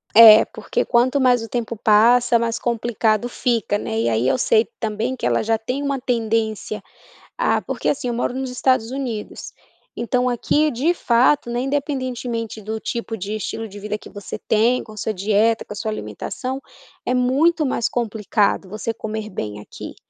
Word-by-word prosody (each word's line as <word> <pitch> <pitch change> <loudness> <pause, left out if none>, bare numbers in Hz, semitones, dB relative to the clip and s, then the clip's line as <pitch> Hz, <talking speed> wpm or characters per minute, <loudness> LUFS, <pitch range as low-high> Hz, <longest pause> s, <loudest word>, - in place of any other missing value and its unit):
É, 220 -1 +10
porque - - -3
quanto 255 +3 +2
mais 250 -3 +3
o 225 - -8
tempo 235 0 -3
passa, 235 +3 +4
mais 230 0 -1
complicado 230 -1 0
fica, 235 -4 0
né. 110 - -3
E 115 - +1
aí 115 +2 +1
eu - - +2
sei 225 -2 +3
também 220 +3 -2
que - - -5
ela 120 -1 +2
já 225 0 +1
tem 250 +6 -4
uma 280 -1 -1
tendência 225 -4 -1 0.6
ah, - - +2
porque - - -4
assim, 255 -3 0
eu - - -1
moro 240 +1 -1
nos 265 0 -3
Estados 250 -2 +1
Unidos. 250 -6 -5 0.4
Então 250 +2 0
aqui, 295 +5 +1
de 280 +9 +1
fato, 250 -2 +2
né, 240 +1 -1
independentemente 255 -5 -3
do 220 +2 -4
tipo 230 0 -4
de 200 +2 -4
estilo 225 +1 -4
de 205 0 -10
vida 210 +1 -3
que - - -13
você 205 0 -7
tem, 225 +4 +2
com - - -13
a 215 - -12
sua 220 - -2
dieta, 215 +3 +2
com - - -15
a - - -11
sua 220 - -3
alimentação, 260 +4 -5 0.4
é 250 - 0
muito 285 +6 +2
mais 245 -3 0
complicado 210 -4 0
você 215 +3 -3
comer 215 -1 -5
bem 105 - -5
aqui. - - -9
230 Hz, 180 wpm, -21 LUFS, 215-250 Hz, 0.6 s, É